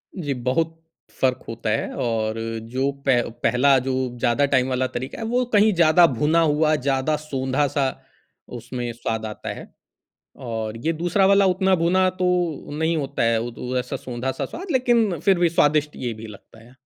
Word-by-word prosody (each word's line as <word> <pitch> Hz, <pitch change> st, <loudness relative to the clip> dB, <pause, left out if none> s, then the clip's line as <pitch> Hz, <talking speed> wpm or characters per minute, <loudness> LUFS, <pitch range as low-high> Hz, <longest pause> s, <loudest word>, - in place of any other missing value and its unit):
जी 150 Hz, -7 st, -2 dB
बहुत। 160 Hz, +6 st, -2 dB, 0.4 s
फ़र्क 130 Hz, -1 st, +1 dB
होता 115 Hz, -1 st, -4 dB
है 110 Hz, -, -1 dB
और 110 Hz, -2 st, -1 dB, 0.4 s
जो 135 Hz, +2 st, 0 dB
पै 125 Hz, -3 st, +4 dB, 0.2 s
पहला 135 Hz, +3 st, +4 dB
जो 130 Hz, +1 st, -3 dB, 0.3 s
ज़्यादा 120 Hz, +4 st, +2 dB
टाइम 130 Hz, -2 st, +2 dB
वाला 130 Hz, 0 st, 0 dB
तरीका 130 Hz, +2 st, -6 dB
है, -, -, -4 dB
वो 245 Hz, +3 st, +1 dB
कहीं 210 Hz, +1 st, +5 dB
ज़्यादा 170 Hz, 0 st, +5 dB
भुना 155 Hz, +5 st, +3 dB
हुआ, 155 Hz, 0 st, +2 dB
ज़्यादा 135 Hz, +2 st, 0 dB
सोंधा-सा, 135 Hz, 0 st, 0 dB, 0.7 s
उसमें 120 Hz, 0 st, -5 dB
स्वाद 110 Hz, -1 st, -3 dB
आता 105 Hz, -1 st, -6 dB
है। -, -, -10 dB, 0.8 s
और 110 Hz, -1 st, -4 dB
ये 165 Hz, -, +2 dB
दूसरा 175 Hz, +3 st, +2 dB
वाला 200 Hz, 0 st, +4 dB
उतना 190 Hz, 0 st, +3 dB
भुना 185 Hz, +2 st, +3 dB
तो -, -, +3 dB, 0.5 s
नहीं 160 Hz, +1 st, +1 dB
होता 140 Hz, -5 st, -2 dB
है, 115 Hz, -1 st, +2 dB
वो 120 Hz, +2 st, -4 dB
तो 125 Hz, +2 st, -4 dB
ऐसा 125 Hz, -, -4 dB
सोंधा-सा 130 Hz, 0 st, -4 dB
स्वाद 365 Hz, +1 st, -7 dB
लेकिन 235 Hz, -, +2 dB
फिर 190 Hz, +2 st, +2 dB
भी 175 Hz, -1 st, +3 dB
स्वादिष्ट 150 Hz, -2 st, +2 dB
ये 120 Hz, -, -1 dB
भी 115 Hz, -, -8 dB
लगता 105 Hz, +1 st, -14 dB
है। 125 Hz, +2 st, -19 dB
140 Hz, 175 wpm, -23 LUFS, 120-165 Hz, 0.8 s, कहीं